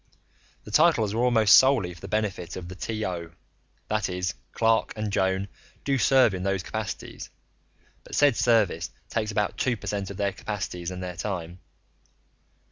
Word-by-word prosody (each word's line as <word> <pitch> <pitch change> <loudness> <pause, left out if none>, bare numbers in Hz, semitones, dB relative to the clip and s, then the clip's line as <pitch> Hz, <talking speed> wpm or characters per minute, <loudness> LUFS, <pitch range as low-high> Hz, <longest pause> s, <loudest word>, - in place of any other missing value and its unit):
The 105 - -11
titles 120 -7 +4
were 115 - 0
almost 115 -4 +6
solely 130 -10 +4
for 85 - -16
the - - -7
benefit 100 -6 -2
of 90 -2 -7
the 90 - -7
T/O 90 -5 -4 0.5
that 110 -2 0
is, 90 0 -2 0.2
Clark 115 0 +2
and 105 -2 -3
Joan 95 +1 +1 0.4
do 135 -1 +1
serve 130 -4 +5
in 90 - -4
those 95 -1 -1
capacities, 110 -1 -5 0.7
but - - -8
said 145 -4 +4
service 110 -9 +2 0.2
takes 110 -2 -1
about 105 -1 -1
two 125 -3 +1
per - - -11
cent 100 -2 -2
of 100 - -7
their 100 -1 0
capacities 95 -4 -4
and 90 0 -6
their 90 -1 -5
time. 90 -2 -4
100 Hz, 165 wpm, -26 LUFS, 90-110 Hz, 0.7 s, almost